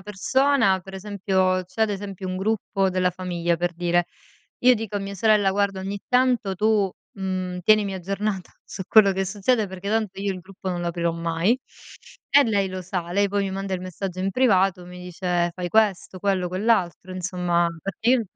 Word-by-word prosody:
persona, 210 +2 +2
per 195 +1 -12
esempio 190 -2 0
c'è 185 +4 -10
ad 220 - +2
esempio 195 -2 -5
un 185 - -3
gruppo 195 -1 0
della 185 0 +1
famiglia, 175 -2 -2
per 175 +1 -1
dire, 175 0 +1 0.5
io 250 +1 +6
dico 220 -2 -6
a 205 - 0
mia 200 0 -6
sorella: 210 -1 +3
"Guarda 195 -1 0
ogni 195 +2 -4
tanto 250 -5 +2
tu, 210 0 +2 0.3
mhmm, 185 -1 -3
tienimi 210 -1 +4
aggiornata 195 +1 -3
su 190 - -7
quello 215 -3 +6
che 190 0 -1
succede, 210 +4 +1
perché 190 +1 -7
tanto 215 -3 -1
io 200 -1 -1
il 185 - -7
gruppo 190 +1 -8
non 175 -1 -2
lo 175 - -3
aprirò 170 0 -1
mai." 170 +7 0 0.7
E 285 0 +6
lei 200 -4 +1
lo 185 0 -5
sa. 175 -1 -4
Lei, 200 +3 +2
poi, 200 0 0
mi 195 - -2
manda 195 0 -3
il 180 - -4
messaggio 185 0 -5
in 195 - 0
privato, 195 -6 +2
mi 180 0 -10
dice: 180 -1 -1
"Fai 180 0 -4
questo, 195 -2 +1
quello, 195 -3 +1
quell'altro." 185 -2 0
Insomma, 180 -1 0 0.2
perché 210 +4 -3
io 255 -2 +4
190 Hz, 190 wpm, -24 LUFS, 180-205 Hz, 0.7 s, io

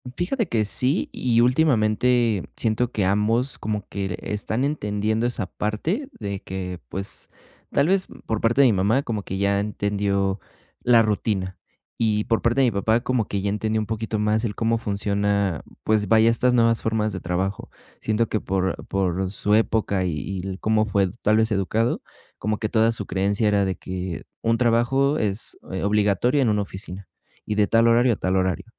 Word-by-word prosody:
Fíjate 215 +5 -1
que 115 -7 +1
sí 125 +6 0
y 120 -2 +2
últimamente 120 - +2
siento 115 +2 0
que 105 - -1
ambos 110 +7 +1
como 105 -2 -3
que 100 -1 -3
l 90 -2 -3
están 105 +4 -2
entendiendo 110 -5 -1
esa 115 -5 -3
parte 160 - -2
de 100 -2 -4
que, 90 -1 -5
pues, 95 +6 -6 0.4
tal 140 +3 +2
vez, 190 0 +2 0.2
por 110 -2 -1
parte 120 +4 +3
de 135 - +7
mi 115 - +3
mamá, 105 +8 +2
como 110 -3 -3
que 95 - -5
ya 100 0 +1
entendió 100 -1 -1 0.4
la 120 -2 +5
rutina. 100 -3 -1 0.4
Y 105 -2 +1
por 115 - +1
parte 120 +4 +2
de 130 - +4
mi - - +1
papá, 110 +4 +1
como 125 -3 0
que 100 - -2
ya 100 - -1
entendió 110 +1 -1
un - - -3
poquito 110 0 -3
más 105 +2 +1
el 105 - -2
cómo 115 0 +1
funciona, 100 -4 -1 0.2
pues 110 -1 +1
vaya, 110 +2 +5
estas 125 +2 +2
nuevas 115 -1 +3
formas 110 -1 0
de 95 - -5
trabajo. 90 +3 -3 0.3
Siento 110 +1 +1
que 110 - 0
por 95 0 -2
por 95 0 -1
su 105 +1 +1
época 105 -4 +1
y 90 - 0
y 95 +4 -5
el 95 0 -5
cómo 110 0 +2
fue 100 -3 +1
tal 110 +1 +4
vez 110 0 +2
educado, 110 +4 0 0.4
como 105 +1 -2
que 110 - -2
toda 115 0 +3
su 105 -3 -5
creencia 100 +3 0
era 100 -1 +2
de 95 - -1
que 90 -1 -5 0.2
un 115 0 +2
trabajo 130 +5 +2
es, 105 0 -1
eh, 95 - -3
obligatorio 105 +6 +2
en 120 - +2
una 105 -1 +1
oficina 95 -1 -8 0.4
y 105 - -1
de 105 -1 +3
tal 115 0 +4
horario 120 +1 +4
a - - -2
tal 95 -1 -1
horario. 95 +1 0
105 Hz, 190 wpm, -23 LUFS, 100-115 Hz, 0.4 s, de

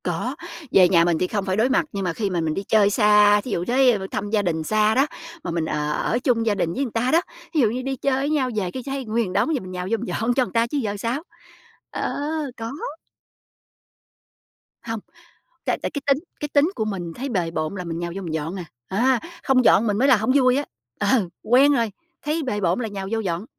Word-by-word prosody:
Có, 180 +10 -2 0.4
về 180 -2 +6
nhà 170 -2 +5
mình 170 -2 +2
thì 180 - +1
không 205 -1 -2
phải 190 -1 0
đối 230 +4 +3
mặt, 265 - +2
nhưng 200 -1 -3
mà 175 -3 -1
khi 205 +2 -2
mà 175 -3 -1
mình 160 -1 -1
đi 195 - -3
chơi 210 -2 +4
xa, 210 0 +5
thí 245 - -7
dụ 175 -2 -1
tới 250 0 +4
b - - -8
thăm 205 0 -3
gia 210 -1 +2
đình 165 -4 -1
xa 215 +4 +2
đó, 275 +3 +4 0.4
mà - - -3
mình, 165 -1 -1
ờ, 150 -1 -1
ở 230 +9 0
chung 240 -3 +1
gia 215 -2 +2
đình 170 -3 -1
với 275 - -1
người 250 - -4
ta 230 +3 0
đó, 330 - +5 0.3
thí 315 - +2
dụ 225 - +4
như 245 +4 -3
đi 270 +1 -2
chơi 265 +1 0
với 280 - 0
nhau 285 -4 +1
về 190 -4 -1
cái 255 - -6
thấy 270 -1 -4
nguyên 220 -4 -1
đống, 320 +10 +2
giờ - - 0
mình 185 - -9
nhào 180 0 -4
vô 230 - +2
mình 235 - -6
dọn 230 +2 0
cho 255 0 +2
người - - -10
ta 230 0 +2
chứ 290 - -3
giờ 210 -6 -2
sao? 235 +8 -2 0.7
Ờ, - - -2 0.4
có. 225 +1 -5 2.2
Hông. 225 -1 -2 0.7
Tại - - 0
tại - - -2
cái 285 - -5
tính 275 -1 +4 0.2
cái 295 - -3
tính 295 +4 +4
của 220 - -1
mình 185 -5 -4
thấy 270 +3 -4
bề 180 -9 -1
bộn 155 +1 -3
là 185 -2 -5
mình 165 -1 -4
nhào 170 0 -4
vô 195 - -4
mình 165 -3 -4
dọn 160 +4 -3
à. 180 - -5 0.2
À, 240 +5 +2 0.2
không 255 -2 +3
dọn 230 - +5
mình 205 -2 +1
mới 270 +4 +3
là 260 - +7
hông 220 +3 -1
vui 255 -2 +4
á. 285 - 0 0.4
Ờ, 205 -2 +2
quen 265 +5 +5
rồi, 230 -6 +1 0.3
thấy 310 +2 -1
bề 230 -7 -2
bộn 180 +4 +1
là 225 - -2
nhào 195 -2 -5
vô 225 - 0
dọn. 185 -3 -2
215 Hz, 255 wpm, -23 LUFS, 185-255 Hz, 2.2 s, là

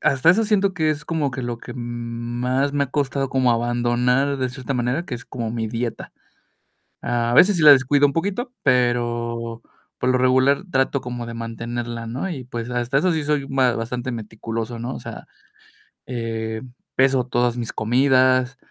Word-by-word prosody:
hasta 150 +1 +4
eso 220 +6 +3
siento 200 -2 +2
que 160 -4 0
es 150 -1 -3
como 155 -4 -1
que 130 0 -5
lo 120 -1 -4
que - - -9
m 125 - -7 0.6
más 130 +3 +1
me 145 -1 +1
ha 135 - -12
costado 140 -2 -1
como 130 -2 +2
abandonar 120 +3 +1
de 130 -1 0
cierta 130 +1 -5
manera, 125 +7 -1
que 130 - -5
es 120 0 -8
como 115 -4 -4
mi 115 -1 -2
dieta. 115 +1 -4 0.9
A 120 0 0
veces 190 +6 +6
sí - - 0
la 150 - +10
descuido 140 +1 +5
un 140 - -3
poquito, 200 - -2
pero 120 -2 0 0.4
por 125 - +1
lo 130 - +3
regular 130 +4 +3
trato 135 0 +1
como 120 -1 -5
de 115 - -7
mantenerla, 115 0 -5
¿no?, 125 +10 -3
y 140 -8 -5
pues, 120 -1 -5
hasta 125 +2 0
eso 180 +5 +2
sí 160 -2 -1
soy 145 -1 0
ba 130 -3 +2
bastante 120 +2 -3
meticuloso, 115 +1 -5
¿no?, 120 +3 -4
o - - -6
sea, - - -9 0.8
eh, 115 -2 -4 0.3
peso 130 -1 +3
todas 120 -1 0
mis 120 -2 -4
comidas, 130 +2 +3
125 Hz, 185 wpm, -22 LUFS, 120-140 Hz, 0.9 s, la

